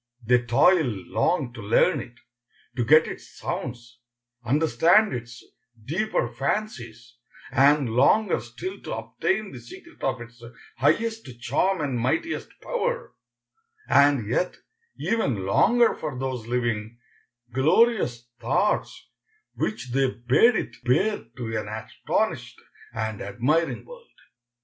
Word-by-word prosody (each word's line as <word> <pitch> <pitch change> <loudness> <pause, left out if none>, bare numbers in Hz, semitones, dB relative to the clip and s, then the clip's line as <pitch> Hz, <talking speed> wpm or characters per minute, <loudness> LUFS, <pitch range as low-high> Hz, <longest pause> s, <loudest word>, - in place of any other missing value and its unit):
They 125 +1 +4
toiled 120 - +2
long 140 -9 0
to 115 - -9
learn 140 - +3
it, 120 - -12 0.6
to 120 - 0
get 155 +6 +6
its - - -9
sounds, 120 0 -6 0.4
understand 165 - +3
its 120 0 -7 0.4
deeper 190 - 0
fancies, 120 - -4 0.3
and 140 +1 +4
longer 135 - +3
still 375 +1 -7
to - - -5
obtain 195 +1 -2
the - - -9
secret 355 -2 -14
of 130 -2 -1
its 115 0 -12 0.4
highest 220 - +1
charm 160 +9 0
and 135 -4 -1
mightiest 160 - -1
power, - - -2 0.7
and 140 -6 +4
yet 120 +11 -1 0.4
even 135 - -1
longer 235 - +4
for 150 -5 -5
those 130 -3 -4
living, 120 -2 -2 0.6
glorious 135 - +2
thoughts 135 - 0 0.5
which 125 - -3
they 135 +1 +2
bade 125 - +3
it 120 - -4
bear 190 - +1
to 115 -3 -4
an 110 -1 -3
astonished 110 +1 -3 0.3
and 110 -1 -4
admiring 125 +8 0
world. - - -13
130 Hz, 115 wpm, -25 LUFS, 120-190 Hz, 0.7 s, get